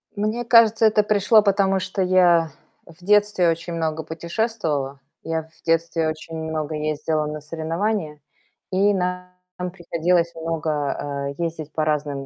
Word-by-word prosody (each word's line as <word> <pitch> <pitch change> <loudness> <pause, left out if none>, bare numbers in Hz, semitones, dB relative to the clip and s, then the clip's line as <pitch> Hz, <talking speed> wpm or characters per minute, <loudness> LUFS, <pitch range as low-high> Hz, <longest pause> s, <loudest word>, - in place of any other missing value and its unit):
Мне 215 +4 -1
кажется, 225 -1 +5
это 215 -1 +4
пришло, 210 +1 +4
потому 195 -1 +2
что 190 +1 -3
я 175 -3 +4 0.3
в 170 +1 -17
детстве 205 -2 +3
очень 170 +1 -3
много 160 -1 -2
путешествовала. 160 - -3 0.2
Я 160 0 -2
в 160 0 -24
детстве 165 0 +1
очень 160 +1 -7
много 160 -1 -3
ездила 155 0 -1
на 150 0 -5
соревнования, 165 +2 -3 0.5
и 200 +2 +3
нам 180 -1 -2 0.4
приходилось 170 -1 0
много, 150 -3 -2
э, 170 - -2
ездить 160 -2 -4
по 155 - 0
разным 145 -2 -1
165 Hz, 135 wpm, -22 LUFS, 155-195 Hz, 0.5 s, кажется